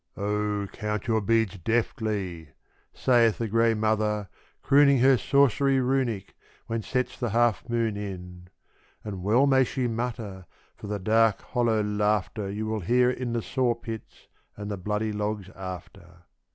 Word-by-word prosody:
"Oh, 105 0 -1
count 105 -1 -3
your 110 -2 +2
beads 110 -2 +1
deftly," 100 -5 -2 0.4
saith 120 -3 +3
the 115 - -2
grey 115 +1 +3
mother, 105 -1 0 0.3
crooning 140 0 +5
Her 130 +2 +5
sorcery 140 +1 +3
runic, 125 -6 -1 0.3
when 115 0 -2
sets 125 +3 -2
the 120 - -1
half 115 +1 +1
moon 115 -3 0
in. 90 -3 -7 0.6
And 100 -3 -6
well 110 +8 +3
may 135 -1 +4
she 130 0 -2
mutter, 115 -6 -4 0.3
for - - -10
the 105 0 -2
dark, 110 +2 +2
hollow 115 -3 0
laughter 105 0 0
You 105 +2 -3
will 110 0 -2
hear 125 +6 +3
in 125 -2 -4
the 115 -2 -1
sawpits 115 -3 -3 0.3
and 105 0 -5
the - - -1
bloody 105 +3 -2
logs 105 -2 -3
after. 90 -2 -9
110 Hz, 145 wpm, -26 LUFS, 100-120 Hz, 0.6 s, crooning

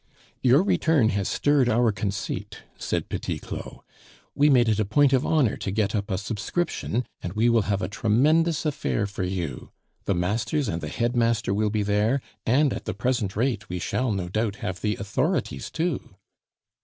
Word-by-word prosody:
"Your 130 +6 +5
return 160 - +3
has 100 -2 -1
stirred 145 -4 +2
our 120 0 +3
conceit," 100 -1 -4
said - - -2
Petit - - -3
Claud; - - -8 0.5
"we 145 +1 +4
made 125 -4 +5
it 110 -1 +2
a - - +3
point 135 +7 +3
of 130 +1 +2
honor 145 -9 +2
to - - -4
get 100 0 0
up 105 0 -2
a 95 - 0
subscription, 115 - -2 0.2
and 85 - -5
we 110 +3 +3
will 115 -1 +4
have 100 -2 0
a - - 0
tremendous 150 - +2
affair 145 -7 0
for 100 -1 -5
you. 90 -4 -3 0.4
The 100 - +1
masters 110 - 0
and 85 -3 -2
the 75 - -4
headmaster 115 - +1
will 105 +1 +1
be 105 0 0
there, 105 +6 +2 0.3
and, 135 +4 +3
at - - -6
the - - -3
present 120 -6 -1
rate, 110 -4 -1
we 90 - -3
shall, 110 +7 -1
no 95 -3 -2
doubt, 105 +2 -1
have 95 -2 -5
the 105 -1 0
authorities 130 - -1
too." 165 -2 -3
110 Hz, 180 wpm, -25 LUFS, 100-130 Hz, 0.5 s, Your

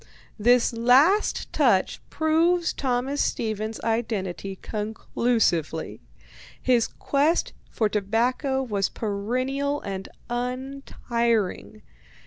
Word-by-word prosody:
This 240 +2 +4
last 265 - +3
touch - - +2
proves 335 +2 +2
Thomas 265 +2 -1
Stevens's 220 0 -2
identity 205 -5 -2
conclusively. 210 -6 -1 0.6
His 240 -3 +2
quest 295 +4 0 0.2
for 220 - +1
tobacco 240 +7 0
was 205 -6 -1
perennial 255 +7 -2
and 195 -1 -5 0.2
untiring. 240 -4 -2
235 Hz, 80 wpm, -25 LUFS, 215-270 Hz, 0.6 s, This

